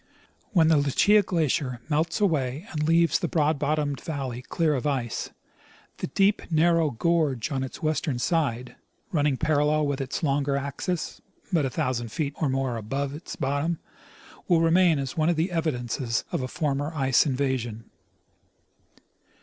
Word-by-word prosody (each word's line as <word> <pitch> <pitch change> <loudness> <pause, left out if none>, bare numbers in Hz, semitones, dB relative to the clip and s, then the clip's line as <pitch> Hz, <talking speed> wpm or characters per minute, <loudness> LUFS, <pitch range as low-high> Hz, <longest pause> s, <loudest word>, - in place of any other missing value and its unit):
When 165 -6 +4
the 160 - +5
Lucia 145 +9 +4
glacier 150 -8 -1
melts 160 +2 0
away 150 -5 0
and 150 -1 -1
leaves 165 0 +4
the 175 - -1
broad 155 -2 +1
bottomed 145 -2 -1
valley 135 -6 -4
clear 155 +4 0
of 135 +1 -1
ice, 130 -5 -2 0.7
the - - -3
deep 195 +8 +2
narrow 165 0 +3
gorge 145 -1 0
on 135 -1 -1
its 130 - -8
western 155 -3 0
side, 125 -5 -1 0.4
running 145 -5 +1
parallel 150 0 +2
with 140 -1 -1
its 135 +4 -4
longer 140 -1 +1
axes, 140 +5 -3 0.3
but 160 -5 +3
a - - 0
thousand 120 -2 -2
feet 145 -1 -2
or 150 - +2
more 130 -2 -1
above 135 +6 -3
its 150 +4 -8
bottom, 145 +5 -1 0.7
Avill 165 -2 +4
remain 170 -1 +4
as 135 +2 -4
one 155 +1 +2
of 175 - +2
the 165 +4 0
evidences 125 -7 -1
of - - -1
a 130 - -2
former 145 0 -2
ice 135 +1 +3
invasion. 125 -5 -2
145 Hz, 155 wpm, -26 LUFS, 130-160 Hz, 0.7 s, the